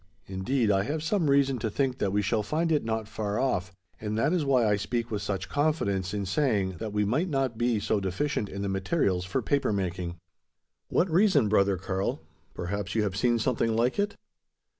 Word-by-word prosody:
Indeed, 105 +5 0
I 95 -1 +3
have 150 +8 -2
some 165 -3 +1
reason 140 -2 +3
to 110 - -1
think 130 +3 -1
that 100 - 0
we 105 +1 +1
shall 105 +3 +1
find 160 +9 -1
it 150 - +2
not 110 -1 -2
far 105 -1 -2
off; 100 -8 0 0.3
and 105 0 -3
that 140 +9 +2
is 175 -4 +1
why 130 -5 +3
I 105 - +3
speak 115 +3 -2
with 105 -2 -2
such 100 -1 -3
confidence, 100 - 0
in 100 -1 -2
saying, 100 - 0
that 110 - -4
we 105 0 +1
might 150 - 0
not 135 -5 0
be 120 -1 +1
so 105 +1 0
deficient 100 +4 -1
in 100 +1 -5
the - - -1
materials 95 - 0
for 115 +7 -2
paper 140 -1 +1
making." 90 -3 -2 0.7
"What 180 - +2
reason, 180 - +4
brother 100 -2 +3
Karl? 95 +1 -2 0.4
Perhaps 95 +2 -3
you 110 - +2
have 100 -2 -2
seen 120 +3 +2
something 115 -1 0
like 120 - +1
it?" 205 0 0
110 Hz, 205 wpm, -28 LUFS, 100-135 Hz, 0.7 s, reason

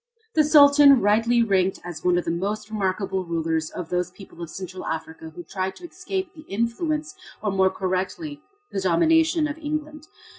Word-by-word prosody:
This 305 -2 +2
Sultan 285 -2 +8
rightly 230 +3 +3
ranked 190 -3 +1
as 175 -3 -8
one 180 -1 +3
of 175 - -1
the - - 0
most 205 +5 -3
remarkable 190 -2 -1
rulers 165 -2 -2
of 175 -3 -7
those 180 0 -1
people 180 -2 -14
of 170 - -6
Central 185 0 -7
Africa 160 0 -5
who 175 - -8
try 190 +2 -3
to 350 - -11
escape 375 0 -5
the 310 - -12
influence, 300 - -1 0.3
or 210 - 0
more 190 0 +3
correctly 190 - -3 0.3
the 195 - -2
domination 315 - +3
of 300 +1 -6
England. 305 0 -5
200 Hz, 175 wpm, -24 LUFS, 180-295 Hz, 0.3 s, Sultan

